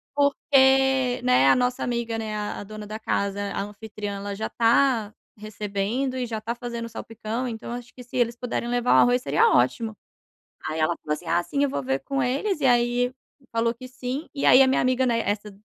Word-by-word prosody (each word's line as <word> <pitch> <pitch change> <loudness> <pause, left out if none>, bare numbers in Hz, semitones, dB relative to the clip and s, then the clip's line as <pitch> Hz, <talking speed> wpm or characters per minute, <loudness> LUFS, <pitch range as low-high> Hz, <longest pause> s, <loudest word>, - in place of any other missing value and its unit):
"porque, 265 -2 +3
né, 125 +2 +4
a - - +6
nossa 250 0 0
amiga, 235 -2 -2
né, 215 -1 -4
a 210 0 -4
a - - -7
dona 215 0 -9
da 215 +1 -6
casa, 200 -2 -1
a 195 - -2
anfitriã, 205 0 -6
ela 200 0 -5
já 220 +2 -3
tá 230 -2 +2 0.2
recebendo 215 +5 -3
e 250 -1 -2
já 225 -1 -4
está 225 +2 -4
fazendo 235 -1 -5
salpicão, 225 +2 -5
então 225 0 -6
acho 245 0 -8
que 250 - -10
se 240 - -10
eles 240 -1 +1
puderem 240 -1 -3
levar 245 0 0
o - - +6
arroz, 245 +1 +4
seria 460 - +3
ótimo." 225 - +1 0.7
Aí 155 0 -3
ela 160 +2 +1
falou 150 - -2
assim: 170 - -11
"Ah, 175 +1 +2
sim 280 +8 -2
eu 280 - +2
vou 140 - -2
ver 135 +1 -1
com 275 0 -2
eles." 290 +8 -1
E 275 - +2
aí 245 0 +2 0.4
falou 230 +1 +1
que 255 +2 -10
sim, 255 +4 -5
e 280 - -3
aí 265 - +8
a - - +5
minha 265 - +2
amiga, 255 0 +2
né, 230 -1 +1
essa 210 0 -2
235 Hz, 215 wpm, -25 LUFS, 210-255 Hz, 0.7 s, aí